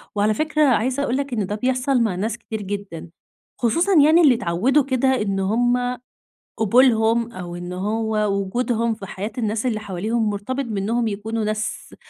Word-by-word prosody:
وعلى 210 Hz, +1 st, +2 dB
فكرة، 305 Hz, +5 st, +1 dB
عايزة 255 Hz, +2 st, +1 dB
أقول 255 Hz, -1 st, 0 dB
لك 280 Hz, -2 st, -3 dB
إن 215 Hz, -4 st, 0 dB
ده 205 Hz, -, -3 dB
بيحصل 255 Hz, +3 st, 0 dB
مع 215 Hz, -6 st, 0 dB
ناس 215 Hz, +4 st, -2 dB
كتير 220 Hz, -2 st, -6 dB
جدًا، 195 Hz, -4 st, -6 dB, 0.5 s
خصوصًا 335 Hz, -, +2 dB
يعني 320 Hz, +3 st, +5 dB
اللي 280 Hz, -7 st, +6 dB
اتعودوا 235 Hz, +8 st, +1 dB
كده 260 Hz, -1 st, 0 dB
إن 195 Hz, -2 st, -1 dB
هُم 245 Hz, +5 st, +1 dB, 0.6 s
قبولهم، 230 Hz, 0 st, +3 dB
أو 175 Hz, -3 st, -7 dB
إن 175 Hz, 0 st, -6 dB
هو 215 Hz, +4 st, -2 dB, 0.2 s
وجودهم 230 Hz, +3 st, -1 dB
في 200 Hz, -3 st, -9 dB
حياة 200 Hz, +3 st, -5 dB
الناس 220 Hz, 0 st, -1 dB
اللي 220 Hz, -4 st, -1 dB
حواليهم، 215 Hz, +3 st, -1 dB
مرتبط 230 Hz, +7 st, -3 dB
بإنهم 225 Hz, +1 st, -1 dB
يكونوا 220 Hz, +2 st, -3 dB
ناس 215 Hz, +1 st, -4 dB
225 Hz, 165 wpm, -22 LUFS, 205-250 Hz, 0.6 s, اللي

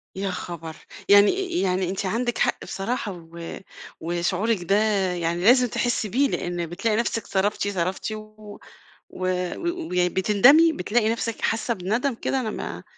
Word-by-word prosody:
يا 195 Hz, 0 st, -2 dB
خبر! 165 Hz, -3 st, -6 dB, 0.3 s
يعني 345 Hz, -, +4 dB
يعني 185 Hz, -1 st, 0 dB
أنتِ 195 Hz, +1 st, -3 dB
عندِك 235 Hz, +5 st, -1 dB
حق -, -, 0 dB
بصراحة 215 Hz, +2 st, -3 dB, 0.2 s
و 170 Hz, 0 st, -7 dB, 0.4 s
وشعورِك 175 Hz, +5 st, -1 dB
ده 195 Hz, +3 st, +2 dB, 0.4 s
يعني 170 Hz, 0 st, -2 dB
لازم 250 Hz, +3 st, +6 dB
تحسي 235 Hz, -2 st, -1 dB
بيه؛ 275 Hz, +3 st, +2 dB
لأن 175 Hz, -1 st, -2 dB
بتلاقي 205 Hz, +6 st, -1 dB
نفسك 230 Hz, -1 st, -1 dB
صرفتِ 200 Hz, +1 st, 0 dB
صرفتِ 190 Hz, +2 st, -2 dB
و 215 Hz, -1 st, -10 dB, 0.5 s
وي 185 Hz, -, -1 dB
بتندمي 250 Hz, -, +5 dB
بتلاقي 215 Hz, +4 st, +1 dB
نفْسِك 230 Hz, -1 st, -3 dB
حاسة 225 Hz, +1 st, 0 dB
بندم 225 Hz, +7 st, -1 dB
كده 265 Hz, -, -1 dB
أنا 225 Hz, -4 st, -2 dB
ما -, -, -6 dB
205 Hz, 140 wpm, -24 LUFS, 180-235 Hz, 0.5 s, لازم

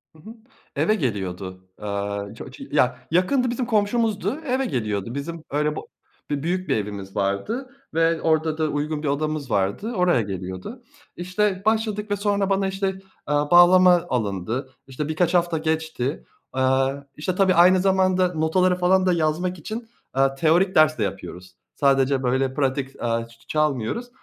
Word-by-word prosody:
Hı -, -, -18 dB
hı. 220 Hz, +8 st, -11 dB, 0.4 s
Eve 215 Hz, -, +2 dB
geliyordu. 95 Hz, -, -4 dB
Aaa, 100 Hz, 0 st, -4 dB
ço -, -, -9 dB
cı -, -, -10 dB
ya, -, -, +2 dB
yakındı 245 Hz, +9 st, +2 dB
bizim 245 Hz, +1 st, -2 dB
komşumuzdu. 220 Hz, +3 st, 0 dB
Eve 260 Hz, +1 st, 0 dB
geliyordu. 110 Hz, -, -2 dB
Bizim 160 Hz, +3 st, -5 dB
öyle 150 Hz, +1 st, 0 dB
bo -, -, -7 dB, 0.4 s
bir 145 Hz, 0 st, -2 dB
büyük 185 Hz, +2 st, -2 dB
bir -, -, +3 dB
evimiz 100 Hz, -2 st, -6 dB
vardı 205 Hz, -, -2 dB, 0.2 s
ve 165 Hz, 0 st, +2 dB
orada 160 Hz, -1 st, +1 dB
da 155 Hz, -1 st, +1 dB
uygun 150 Hz, +1 st, -2 dB
bir -, -, -1 dB
odamız 145 Hz, -2 st, -2 dB
vardı. 100 Hz, -, 0 dB
Oraya 180 Hz, -9 st, +3 dB
geliyordu. 95 Hz, -, -6 dB, 0.3 s
İşte 185 Hz, +2 st, -1 dB
başladık 215 Hz, -1 st, 0 dB
ve -, -, +3 dB
sonra 200 Hz, -1 st, 0 dB
bana 195 Hz, 0 st, +1 dB
işte, 195 Hz, 0 st, -1 dB
eee, 190 Hz, 0 st, -7 dB, 0.5 s
bağlama 175 Hz, 0 st, +7 dB
alındı. 110 Hz, +2 st, -2 dB, 0.2 s
İşte 140 Hz, +3 st, -4 dB
birkaç 170 Hz, +3 st, 0 dB
hafta 170 Hz, -2 st, +2 dB
geçti. 160 Hz, -3 st, -2 dB, 0.3 s
Aaa, 130 Hz, +1 st, +2 dB, 0.2 s
işte 180 Hz, +4 st, -2 dB
tabii 190 Hz, -1 st, +4 dB
aynı 180 Hz, +2 st, +6 dB
zamanda 185 Hz, -1 st, +2 dB
notaları 180 Hz, +3 st, +2 dB
falan 185 Hz, +1 st, +3 dB
da 180 Hz, -, +3 dB
yazmak 170 Hz, +2 st, -1 dB
için, 225 Hz, +8 st, -6 dB, 0.3 s
aaa, 135 Hz, 0 st, +2 dB
teorik 170 Hz, +6 st, +2 dB
ders 155 Hz, 0 st, +5 dB
de 110 Hz, -, 0 dB
yapıyoruz. 90 Hz, -2 st, -6 dB, 0.2 s
Sadece 135 Hz, -1 st, +2 dB
böyle 130 Hz, +1 st, +1 dB
pratik, 135 Hz, -1 st, -2 dB
aaa, 115 Hz, -1 st, -1 dB
ç 115 Hz, 0 st, -19 dB
ç -, -, -25 dB
çalmıyoruz. 150 Hz, -, 0 dB
160 Hz, 160 wpm, -23 LUFS, 130-185 Hz, 0.5 s, bağlama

